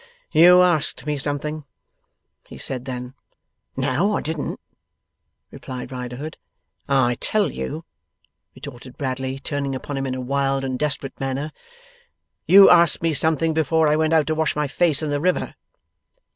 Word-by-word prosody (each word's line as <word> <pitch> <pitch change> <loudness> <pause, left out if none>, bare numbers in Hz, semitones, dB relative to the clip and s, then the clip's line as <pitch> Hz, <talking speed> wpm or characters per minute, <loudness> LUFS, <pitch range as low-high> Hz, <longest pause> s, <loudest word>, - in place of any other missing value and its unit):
'You 180 +3 +7
asked 155 -7 +1
me 150 -1 -1
something,' 145 +2 -4 0.8
he - - -11
said 130 -2 -5
then. 125 -1 -6 0.6
'No, 145 +10 +1
I - - -3
didn't,' 160 -1 -4 0.9
replied 130 0 -8
Riderhood. 125 +5 -6 0.5
'I 125 -3 +2
tell 215 -2 +1
you,' 160 +3 -6 0.7
retorted 130 -2 -11
Bradley, 130 -1 -3
turning 140 -1 -3
upon 140 +2 -5
him 135 0 -2
in 130 - -3
a - - -5
wild 135 +1 -1
and 130 -1 -3
desperate 145 -2 -2
manner, 135 +3 -3 1.0
'you 195 +1 +9
asked 170 -2 +5
me 165 -1 +1
something, 160 +2 0
before 160 0 +2
I 150 - +3
went 155 +1 +1
out 155 -2 +4
to 160 - -1
wash 160 0 0
my 150 0 0
face 155 +1 +1
in 150 - -2
the 145 0 -1
river. 180 +2 0
145 Hz, 150 wpm, -22 LUFS, 130-160 Hz, 1.0 s, you